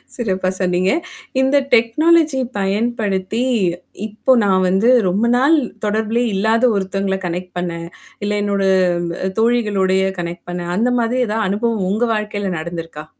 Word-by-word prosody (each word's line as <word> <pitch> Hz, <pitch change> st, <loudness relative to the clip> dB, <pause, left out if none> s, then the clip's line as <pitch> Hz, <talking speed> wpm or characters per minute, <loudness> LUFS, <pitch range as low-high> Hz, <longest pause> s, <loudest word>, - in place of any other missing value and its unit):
சிறப்பா 190 Hz, -6 st, -1 dB
சொன்னீங்க. 185 Hz, 0 st, +1 dB, 0.5 s
இந்த 265 Hz, +2 st, +2 dB, 0.2 s
டெக்னாலஜிய 300 Hz, +4 st, +3 dB
பயன்படுத்தி, 205 Hz, +1 st, -1 dB, 0.6 s
இப்போ 220 Hz, +5 st, -1 dB
நான் 185 Hz, -2 st, +2 dB
வந்து 195 Hz, +6 st, +2 dB, 0.2 s
ரொம்ப 200 Hz, +6 st, +1 dB
நாள் 285 Hz, +6 st, +4 dB, 0.3 s
தொடர்புலே 220 Hz, +3 st, 0 dB
இல்லாத 220 Hz, +4 st, +1 dB
ஒருத்தங்கள 195 Hz, 0 st, -1 dB
கனெக்ட் 180 Hz, +1 st, -5 dB
பண்ணேன், 170 Hz, -1 st, -4 dB, 0.4 s
இல்ல 205 Hz, 0 st, 0 dB
என்னோட 200 Hz, -1 st, 0 dB, 0.6 s
அ -, -, -1 dB
தோழிகளோடேய 200 Hz, -5 st, +2 dB
கனெக்ட் 170 Hz, 0 st, -6 dB
பண்ணேன். 175 Hz, 0 st, -4 dB
அந்த 240 Hz, +4 st, +2 dB
மாதிரி 240 Hz, +2 st, 0 dB
ஏதாவது 215 Hz, -1 st, -1 dB
அனுபவம் 215 Hz, -1 st, -1 dB
உங்க 215 Hz, +5 st, 0 dB
வாழ்க்கையில 210 Hz, -2 st, -3 dB
நடந்திருக்கா? 165 Hz, -2 st, -7 dB
205 Hz, 125 wpm, -18 LUFS, 185-230 Hz, 0.6 s, நாள்